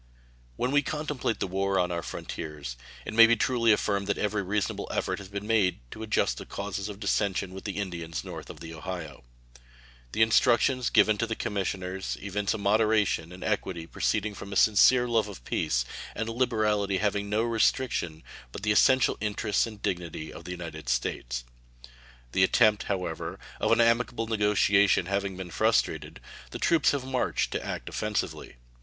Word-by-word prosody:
When 125 - -1
we 145 0 +4
contemplate 150 -5 -2
the - - 0
war 95 +1 0
on 90 -1 +1
our 85 -1 -2
frontiers, 75 -6 -6 0.3
it - - -5
may 115 +1 +9
be 115 - +4
truly 115 0 +2
affirmed 100 -1 +1
that 100 - 0
every 105 0 0
reasonable 100 +1 -2
effort - - -1
has 100 - -9
been 100 +1 -6
made 105 -4 +2
to 110 - -8
adjust 105 - 0
the - - -8
causes 100 +1 -4
of 100 -1 -8
dissension 100 -2 0
with 95 - -9
the 100 -2 -4
Indians 85 -5 -4
north - - -8
of - - -10
the 80 0 -8
Ohio. 80 -5 -7 0.9
The 110 - +4
instructions 120 +3 +3
given 105 -1 +4
to 115 - 0
the 110 - -2
commissioners 95 -2 -3
evince 100 +1 -2
a - - -3
moderation 105 -4 +2
and 90 - -9
equity 95 -5 -2
proceeding 105 +5 -1
from 100 +1 -9
a - - -4
sincere 120 +5 +5
love 115 -3 +1
of 95 -12 -10
peace, - - 0 0.3
and 115 - -2
a - - -3
liberality 110 -5 +1
having 100 0 -1
no 105 +2 +1
restriction 115 -8 0 0.3
but - - -8
the 105 - +2
essential 130 +4 +4
interests 105 +1 0
and 105 -2 -11
dignity 85 -3 -3
of 85 - -11
the 90 - -6
United 85 -6 -7
States. - - -2 0.9
The 95 - +3
attempt, 105 +2 +4
however, 90 -5 -3 0.2
of - - +1
an 115 - +4
amicable 115 0 +2
negotiation 105 -3 +3
having 100 0 -2
been 95 -2 -7
frustrated, 85 - 0 0.3
the - - -6
troops 165 -3 +3
have 140 -3 -1
marched 130 -1 -1
to - - -2
act - - -5
offensively. - - -3
100 Hz, 175 wpm, -28 LUFS, 90-110 Hz, 0.9 s, may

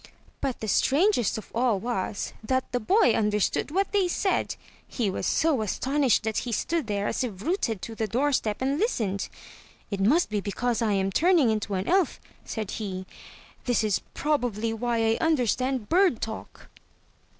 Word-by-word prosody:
But 265 -3 -2
the 220 - -3
strangest 275 - +2
of 220 - -9
all 235 -3 +2
was, 215 -3 -3
that 260 +3 -1
the 245 - 0
boy 390 - +4
understood 210 +2 +1
what 390 +6 0
they 400 -3 +2
said. 380 +2 0 0.3
He 220 -6 -1
was - - -2
so 315 -7 +2
astonished 265 +4 +1
that 220 -1 0
he 245 - -4
stood 325 +4 -1
there 205 -1 -1
as - - -1
if 205 -6 -5
rooted 270 - -1
to 230 - -5
the 220 0 -2
doorstep 250 -1 0
and 275 +3 0
listened. 215 - -1 0.3
" - - -26
It 200 - -2
must 240 - +3
be 210 -1 0
because 235 +4 -1
I 220 -2 +2
am 195 0 +1
turning 325 - +4
into 210 -2 -2
an 185 +2 -2
elf," 375 -1 +2 0.2
said 215 -3 -4
he. 190 -3 -4 0.6
"This 245 -2 +2
is 210 -3 +1
probably 235 -7 0
why 230 0 0
I 225 0 +2
understand 255 -5 +1
bird 360 - +3
talk." 220 0 -7
235 Hz, 175 wpm, -26 LUFS, 210-290 Hz, 0.6 s, boy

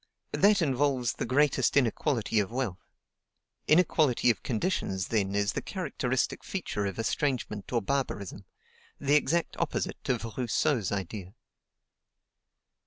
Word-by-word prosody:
That 200 -2 +4
involves 135 -4 +1
the - - -4
greatest 135 0 +3
inequality 120 -3 +1
of 100 - 0
wealth. 120 -6 -3 0.9
Inequality 155 -7 +4
of 100 -7 -5
conditions, 110 - -1
then, 100 -3 0
is 100 -1 +2
the - - -2
characteristic 130 -9 -2
feature 105 - -3
of 95 - -5
estrangement 115 -3 -2
or 120 -3 +1
barbarism: 100 -6 -3 0.5
the 140 +1 +1
exact 165 +3 +2
opposite - - -2
of 120 -3 0
Rousseau's 120 - +1
idea. 95 0 -5
125 Hz, 115 wpm, -29 LUFS, 105-145 Hz, 0.9 s, That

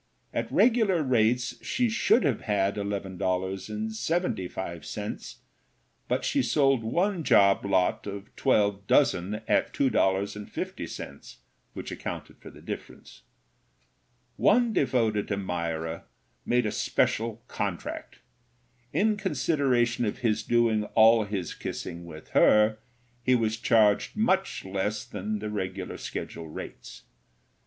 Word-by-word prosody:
At - - -2
regular 220 -9 +3
rates 125 -1 +1
she 245 0 +1
should 235 +2 +3
have - - +1
had 100 -2 +1
$11.75, 100 - -3 0.7
but - - 0
she - - +2
sold 135 -5 +2
one 175 - 0
job 100 -7 +5
lot 95 0 +1
of 100 0 -8
twelve 100 -1 +1
dozen 105 -6 +2
at - - +1
$2.50, 100 -5 -2 0.4
which - - -7
accounted - - -6
for - - -11
the - - -15
difference. - - -8 1.2
One 235 +1 +4
devoted 115 - +1
admirer 85 -4 -3 0.4
made 125 -1 +2
a 105 - 0
special 115 +2 0
contract. 95 -4 -5 0.7
In 215 0 +2
consideration 135 - +1
of 105 - -2
his 110 -1 +2
doing 115 -1 +2
all 110 0 +6
his 100 -4 -4
kissing 85 +1 -6
with 80 -2 -11
her, 105 0 +4 0.4
he 130 +1 +3
was 110 -2 +1
charged 110 - +3
much 195 - +1
less 100 +2 -2
than 215 0 -4
the 105 - -5
regular 95 -2 -4
schedule 80 - -6
rates. - - -9
110 Hz, 110 wpm, -27 LUFS, 100-130 Hz, 1.2 s, all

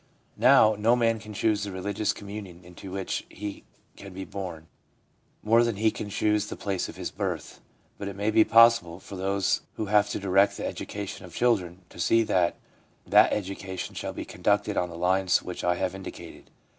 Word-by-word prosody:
' - - -39
Now, 115 -1 +6
no 115 +3 +4
man 115 -2 +1
can 110 0 -10
choose 105 0 +1
the 100 -1 -4
religious 100 +3 -1
communion 100 -4 -9
into 90 +2 -11
which 95 0 -3
he 100 0 -7 0.3
can 100 -2 -11
be 95 0 -5
born, 90 -5 -7 0.8
more 115 +2 +5
than 115 -2 0
he 110 +2 +2
can 105 - -6
choose 105 0 +1
the - - -6
place 95 -3 -3
of - - -9
his - - -5
birth. - - -4 0.4
But 100 - -4
it 100 - -6
may 105 +2 0
be 110 0 +6
possible, 115 -7 +5
for 100 - -10
those 95 +1 0
who 110 - -3
have 105 0 +4
to - - -3
direct 100 +1 +3
the - - -4
education 100 -1 -6
of 90 -3 -12
children, 95 -7 0
to - - -14
see 115 0 +3
that 90 -5 +1 0.5
that - - +5
education 95 -2 -4
shall - - -5
be - - -6
conducted - - 0
on 90 - 0
the 85 - -9
lines 95 +1 +2
which 90 - -6
I 90 0 +2
have 95 +1 -2
indicated. 95 0 -10
100 Hz, 195 wpm, -27 LUFS, 95-110 Hz, 0.8 s, Now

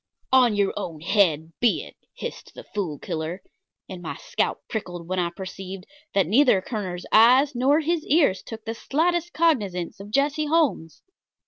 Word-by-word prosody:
"On 250 -4 +5
your 200 -1 +1
own 170 -6 -5
head 165 -4 +2
be 240 -2 +2
it," - - -13 0.2
hissed - - -8
the - - -9
Fool 180 -8 -4
Killer, 160 +6 -5 0.4
and 185 -2 -8
my 165 - -5
scalp - - -2
prickled 175 -6 -5
when 185 +1 -1
I 175 -1 0
perceived 190 +1 -8 0.3
that 195 - +4
neither 230 - +4
Kerner's 185 -4 -5
eyes 255 +6 +6
nor 270 +5 +3
his 325 0 0
ears 280 - +3
took 225 -1 -9
the 225 - -3
slightest 345 +8 0
cognizance 210 - 0
of 200 +1 -9
Jesse 290 +5 +1
Holmes. 290 - 0
210 Hz, 160 wpm, -24 LUFS, 180-275 Hz, 0.4 s, eyes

